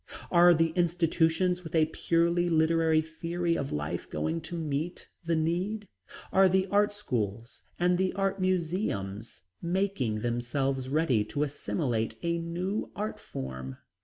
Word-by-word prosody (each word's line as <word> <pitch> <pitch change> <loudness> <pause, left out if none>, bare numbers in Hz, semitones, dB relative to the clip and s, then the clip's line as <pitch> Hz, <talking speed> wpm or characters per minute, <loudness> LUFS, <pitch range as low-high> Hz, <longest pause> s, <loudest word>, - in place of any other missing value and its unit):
Are 175 0 +7
the 165 +1 +3
institutions 175 +1 +1
with 165 - -6
a 160 -1 +5
purely 170 +2 +1
literary 160 -1 +3
theory 170 +2 -2
of 140 -3 -3
life 75 0 -3
going 165 +1 -2
to 165 +2 -7
meet 155 +2 -3 0.2
the 165 0 +1
need? 180 +7 -1 0.5
Are 190 0 +6
the 190 +1 +3
art 205 +1 +4
schools 115 - -3 0.2
and 175 0 +2
the 190 0 +2
art 195 0 -1
museums 160 - -2 0.2
making 170 - 0
themselves 130 +3 -1
ready 140 -7 +2
to 145 - -1
assimilate 125 -6 -2
a 170 0 0
new 175 +5 -3
art 210 +2 -3
form? 65 0 -6
165 Hz, 135 wpm, -29 LUFS, 135-180 Hz, 0.5 s, Are